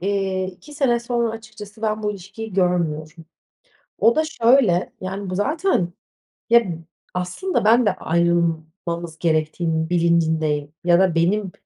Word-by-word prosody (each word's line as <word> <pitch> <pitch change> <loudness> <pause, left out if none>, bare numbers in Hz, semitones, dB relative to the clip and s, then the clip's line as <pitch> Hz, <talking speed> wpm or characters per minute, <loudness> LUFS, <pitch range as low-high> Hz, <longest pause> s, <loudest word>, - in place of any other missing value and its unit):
eee, 195 -1 -1
2 190 +10 -12
sene 250 -5 +2
sonra 235 -1 -1
açıkçası 220 -1 -10
ben 215 0 -1
bu 210 - 0
ilişkiyi 200 +2 -8
görmüyorum. 165 -3 -1 0.8
O 230 +1 +4
da 315 - +3
şöyle, 235 - +3
yani, 190 +1 -5
bu 185 - -3
zaten, 270 - 0 0.6
ya, 235 0 +6 0.5
aslında 180 - -2
ben 235 +2 +5
de - - +2
ayrılmamız 170 0 -1
gerektiğinin 160 0 0
bilincindeyim 160 -4 +1
ya 175 0 +4
da 185 -3 +3
benim, 190 +4 +1
185 Hz, 130 wpm, -22 LUFS, 170-220 Hz, 0.8 s, ya